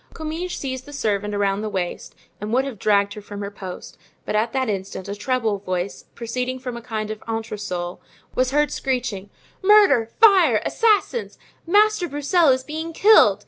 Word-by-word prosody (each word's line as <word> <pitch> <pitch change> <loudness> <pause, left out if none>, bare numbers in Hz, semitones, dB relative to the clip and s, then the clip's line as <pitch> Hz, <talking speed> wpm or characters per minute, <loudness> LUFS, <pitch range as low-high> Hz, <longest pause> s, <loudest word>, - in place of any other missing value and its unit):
Comminges 325 +3 -4
seized 260 0 -5
the 290 - -10
servant 210 -5 -1
around 200 0 0
the 215 - -3
waist 185 -3 -4 0.2
and 210 +1 -5
would 260 +3 +2
have 255 -7 -7
dragged 200 -1 +2
her 210 - -9
from 205 0 -8
her 200 0 -5
post; 190 -3 -9 0.3
but - - -2
at 220 +2 +1
that 260 0 -1
instant 190 -2 -4
a 200 - -4
treble 220 -1 -1
voice, 185 -1 -4
proceeding 250 +2 -3
from 250 -2 -6
a 235 - -7
kind 215 -2 -4
of 215 - -7
entresol, 210 -6 -4 0.3
was 255 0 +1
heard 295 +1 +1
screeching: 240 -7 -2 0.3
"Murder! 390 - +5
fire! 370 - +6
assassins! 455 +1 +1 0.3
Master 415 0 +3
Broussel 300 +4 +2
is 260 0 +2
being 320 +4 -5
killed! 320 - +6
235 Hz, 175 wpm, -22 LUFS, 205-295 Hz, 0.3 s, fire